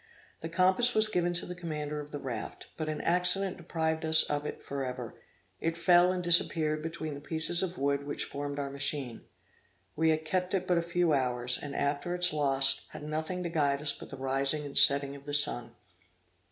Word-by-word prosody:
The 165 - -6
compass 190 +8 +2
was 215 0 +4
given 175 -4 0
to 175 - -1
the 180 - -6
commander 150 -4 -5
of 150 0 -8
the 145 - -6
raft, 130 -6 -7
but 155 -1 -4
an 155 -1 -4
accident 180 +2 +4
deprived 160 -1 -2
us 160 0 +5
of 145 0 -3
it - - -6
forever; 130 -4 -5 0.5
it 165 0 -2
fell 175 +1 +4
and 180 -1 -3
disappeared 160 -3 +3
between 160 -1 -5
the 140 - -9
pieces 160 +3 -2
of 185 -1 -3
wood 140 +1 -1
which 145 - -3
formed 145 0 -5
our 140 -1 -4
machine. 140 -3 -3 0.7
We 160 +1 +2
had 155 0 0
kept 180 +3 -1
it 185 -1 -1
but 180 -2 +2
a - - 0
few 170 -1 0
hours, 125 -2 +1
and, 145 -1 -7
after 145 +5 -1
its 180 -2 +3
loss, 135 -2 +2
had - - -10
nothing 155 +4 -4
to 170 - -3
guide 145 -4 0
us 150 -1 0
but - - -11
the 135 - -9
rising 135 +3 +2
and 140 - -9
setting 140 0 +5
of 140 0 -13
the 145 0 -1
sun. 120 -5 -1
155 Hz, 205 wpm, -30 LUFS, 140-175 Hz, 0.7 s, us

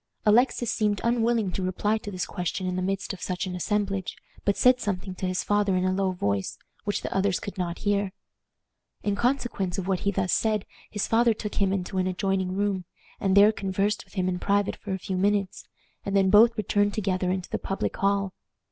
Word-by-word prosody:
Alexis 235 +2 +3
seemed 210 -3 +1
unwilling 235 -3 +2
to 190 - -3
reply 190 +3 0
to 215 -1 -5
this 185 -3 -3
question 180 +1 -3
in 180 0 -1
the 185 - -1
midst 195 +2 -2
of 195 - -10
such 180 0 -2
an 185 - -4
assemblage, 195 0 -1 0.3
but 200 - +1
said 250 0 +5
something 190 -3 -3
to 185 0 -3
his 185 0 -1
father 205 -2 +2
in 185 0 +1
a 185 - +2
low 195 0 +1
voice, 100 - -1 0.3
which 205 - -1
the - - -4
others 195 -1 +2
could 200 - -7
not 175 -3 -3
hear. 200 -1 +1 0.9
In 205 -1 0
consequence 235 -6 0
of 190 -1 -3
what 190 -2 +1
he 200 - 0
thus 190 -2 0
said 215 -3 +1 0.2
his 210 -1 -1
father 230 0 +3
took 210 0 -5
him 195 -1 +3
into 190 0 -2
an 185 - +1
adjoining 185 0 -1
room, 200 -2 0 0.3
and 195 0 +2
there 205 +2 +8
conversed 200 0 -1
with - - -21
him 185 -2 0
in 180 -1 -1
private 200 +1 +1
for 205 - -8
a 190 - 0
few 190 0 -4
minutes, 200 0 0 0.4
and 200 0 0
then 190 -1 +3
both 230 +3 +6
returned 205 0 +1
together 185 -3 0
into 185 -1 -3
the - - -1
public 195 - -2
hall. 200 -1 +1
195 Hz, 210 wpm, -26 LUFS, 185-205 Hz, 0.9 s, there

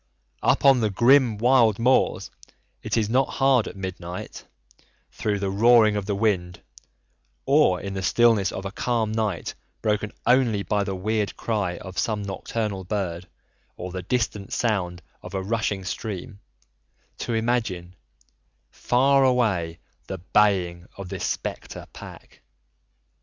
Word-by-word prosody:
Up - - +2
on 135 -2 +7
the 110 -2 +1
grim 120 +2 +4
wild 115 -2 +4
moors 125 +3 +2 0.5
it - - -2
is 110 -2 +1
not 130 +4 +2
hard 135 -4 +3
at - - -8
midnight, 90 -2 -7 0.6
through 105 -1 -2
the 100 -1 -2
roaring 110 +1 +5
of 100 -1 -3
the 100 - 0
wind, 95 -5 0 0.9
or 135 -11 +4
in 100 0 -6
the 95 - -3
stillness 110 0 +3
of 95 - -6
a 100 - -4
calm 115 0 -1
night 110 -5 -2 0.3
broken 105 -1 0
only 120 -5 +3
by 105 -1 0
the 100 -1 -3
weird 105 +2 -2
cry 100 -6 -2
of 95 +1 -7
some 105 -3 -1
nocturnal 100 0 -4
bird 90 -3 -3 0.5
or 90 +1 -6
the 90 0 -5
distant 105 -1 -2
sound 90 -6 -1 0.2
of 90 +1 -9
a 95 - -2
rushing 105 -2 -2
stream, 100 +2 -5 0.8
to 115 - -2
imagine, 110 -7 -1 0.8
far 135 +2 +3
away, 105 -11 +1 0.3
the 95 - -4
baying 90 -2 +1
of 100 -2 -7
this 95 -1 -4
spectre - - -5
pack. - - -12
105 Hz, 140 wpm, -24 LUFS, 95-115 Hz, 0.9 s, on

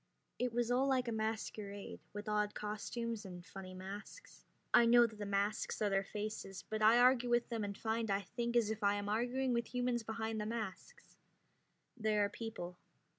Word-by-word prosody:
It 250 0 +1
was 240 +1 0
all 260 +2 +3
like 260 -2 +2
a - - 0
masquerade, 215 -2 -3
with 205 +1 -6
odd 210 0 +1
costumes 220 +2 -3
and 180 -3 -9
funny 185 -1 -8
masks. 195 - -9 0.3
I 235 - +7
know 240 0 +8
that 220 -2 -6
the 205 - -3
masks 200 +1 0
are 210 -2 +1
their 195 0 +2
faces, 205 -2 -5
but 215 0 -3
I 220 +2 +7
argue 250 0 +5
with 240 0 +2
them 230 -3 -2
and 200 -1 -4
find 225 0 -1
I 200 0 +2
think 235 +5 -3
as 225 -3 +4
if 220 0 -4
I 200 0 +4
am 205 0 -3
arguing 245 +4 +1
with 235 +1 -2
humans 245 -1 +1
behind 220 0 -3
the 210 - -2
masks. 220 -5 -6 0.8
They 215 -3 +1
are 205 -1 +3
people. 190 -6 -6
220 Hz, 190 wpm, -36 LUFS, 205-235 Hz, 0.8 s, know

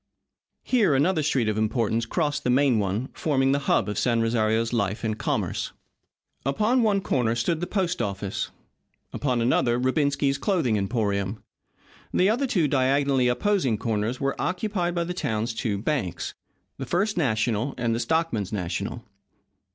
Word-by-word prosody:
Here 210 - +3
another 155 +4 +2
street 135 -6 +1
of 110 0 0
importance 115 +1 0
crossed 150 0 -1
the - - 0
main 130 -2 +3
one, 105 +6 -1
forming 135 -3 +1
the 140 - +2
hub - - +3
of 105 -1 -2
San 120 -2 +2
Rosario's 115 0 +1
life 105 -1 -1
and 110 -1 0
commerce. - - -2 0.7
Upon 215 - +2
one 205 -3 +2
corner 120 -9 +1
stood 140 +8 0
the 175 - -3
post 185 -6 -1
office. 100 -1 -3 0.6
Upon 125 -5 0
another 120 -1 +2
Rubensky's 140 +1 +1
Clothing 165 - +1
Emporium. 100 -1 -1 0.7
The 190 +3 +3
other 260 +5 0
two 175 -10 +2
diagonally 135 -1 +2
opposing 135 - +1
corners 115 +2 -1
were 135 0 0
occupied 180 -1 -1
by 170 - +1
the 175 +1 -4
town's 115 -9 -2
two 110 -2 -2
banks, 100 - -2 0.5
the 135 - -4
First 195 - 0
National 120 -3 0
and 115 -2 0
the 115 - -1
Stockmen's 120 - 0
National. 90 -5 -3
125 Hz, 150 wpm, -25 LUFS, 110-160 Hz, 0.7 s, Here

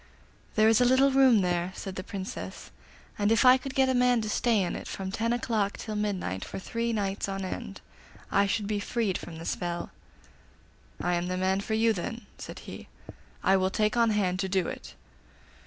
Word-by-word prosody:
'There 215 0 +5
is 225 +1 +5
a - - +5
little 260 +2 +5
room 260 -5 +5
there,' 180 0 0
said 195 - -6
the 185 - -5
Princess, 195 0 -7 0.5
'and 205 +1 +2
if 225 +3 +4
I 255 0 +9
could 265 0 -7
get 265 -1 +4
a 260 - +2
man 250 -1 +3
to 215 - -3
stay 225 -4 +2
in 175 - -2
it - - -7
from 190 -1 -5
ten 230 +3 -1
o'clock 220 -4 0
till 215 -2 -5
midnight 195 - -2
for - - -7
three 230 +4 -2
nights 200 -2 -2
on 195 0 -3
end 185 - -6 0.5
I 200 0 +3
should 205 +1 -1
be 205 0 -1
freed 215 -2 -1
from 165 - -9
the 165 - -8
spell.' 175 -1 -3 1.1
'I 175 - 0
am 175 0 0
the 185 0 -2
man 190 +1 +1
for 220 +2 -2
you, 225 +1 +3
then,' 225 +5 -5
said - - -8
he; - - -9 0.6
'I 190 +1 +5
will 185 0 +1
take 215 +3 +1
on 235 -1 +4
hand 190 -4 +1
to 190 - -1
do 185 -2 +1
it. - - -8
205 Hz, 205 wpm, -28 LUFS, 190-230 Hz, 1.1 s, I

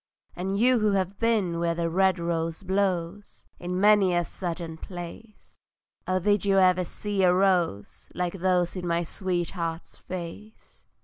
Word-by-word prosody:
And 190 +2 -2
you 245 +3 +4
who 215 -1 +2
have 195 0 -1
been 210 -7 +1
where 170 0 0
the 170 0 -1
red 190 +2 +2
rose 165 0 -2
blows 190 0 -2
In 180 +1 -3
many 200 -3 +5
a 175 0 +1
Southern 170 -2 -5
place, 180 +6 -10 0.5
Oh 185 - +1
did 205 +2 +2
you 195 -1 +2
ever 185 -1 +4
see 205 +3 -3
a 180 -1 +5
rose 180 - 0
Like 180 +1 -2
those 180 -1 +1
in 180 -1 -4
my 170 0 +1
sweetheart's 175 -2 -3
face? 185 +5 -9
185 Hz, 150 wpm, -26 LUFS, 170-195 Hz, 0.5 s, many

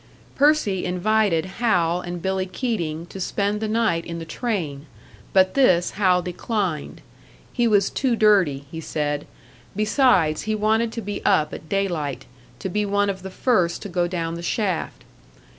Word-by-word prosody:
Percy 280 -10 +2
invited 180 -1 +1
Hal 180 -4 +1
and 175 -1 -6
Billy 190 0 -1
Keating 170 -8 -3
to 190 - -10
spend 205 +3 -1
the 220 - -1
night 215 -7 +1
in 170 0 -6
the 165 - -6
train; 160 - -3 0.4
but 185 -1 +4
this 185 -11 +3
Hal 185 -3 +2
declined. 180 -3 -3 0.5
He 240 -1 +2
was 205 -3 +3
too 260 -3 +1
dirty, 190 -11 +3
he 160 - -6
said; 145 -2 -2 0.5
besides, 210 - +3
he 215 - +2
wanted 220 +2 +1
to 230 - -4
be 205 0 -5
up 155 -6 +2
at 155 - -9
daylight, 160 -10 -2 0.3
to 190 - -5
be 210 +3 -1
one 205 0 +1
of 190 -1 -9
the 190 - -7
first 185 -5 +1
to 205 - -6
go 175 -1 0
down 165 -2 -3
the 170 - -5
shaft. 185 -1 -2
190 Hz, 160 wpm, -23 LUFS, 170-215 Hz, 0.5 s, but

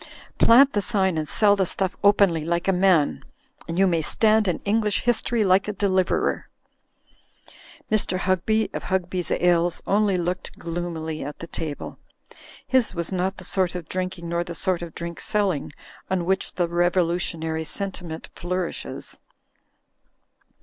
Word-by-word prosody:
Plant 270 +4 +6
the 205 - +1
sign 190 -2 +1
and 155 -1 -3
sell 205 -2 +4
the 190 -2 0
stuff 185 0 -1
openly 200 -6 +4
like 170 +2 -1
a 195 - +4
man, 180 -5 +2 0.4
and 165 0 -4
you 195 - +5
may 170 -3 +2
stand 215 +6 +3
in 180 - +1
English 210 0 +1
history 235 -1 +1
like 190 0 +3
a 210 - -2
deliverer." 190 -2 0 1.4
Mr. 205 -3 +1
Hugby, 190 +4 0
of - - -5
Hugby's 180 -2 -1
Ales, 175 -1 +1
only 200 -1 +2
looked 180 +1 -3
gloomily 165 -2 -4
at 145 +1 -6
the - - -7
table. 160 -3 -6 0.7
His 260 -4 +1
was 170 +1 -3
not 190 +1 -1
the 185 - -9
sort 185 -1 +1
of 175 -3 -6
drinking 185 -2 -4
nor 170 +1 -1
the 170 0 -7
sort 185 -1 0
of 170 -2 -8
drink 170 0 -5
selling 195 -10 0 0.4
on 185 -2 0
which 190 +1 -1
the 175 -2 +1
revolutionary 170 -2 0
sen 195 +5 -2
timent 165 -4 -8
flourishes. 180 0 -4
180 Hz, 150 wpm, -24 LUFS, 170-195 Hz, 1.4 s, Plant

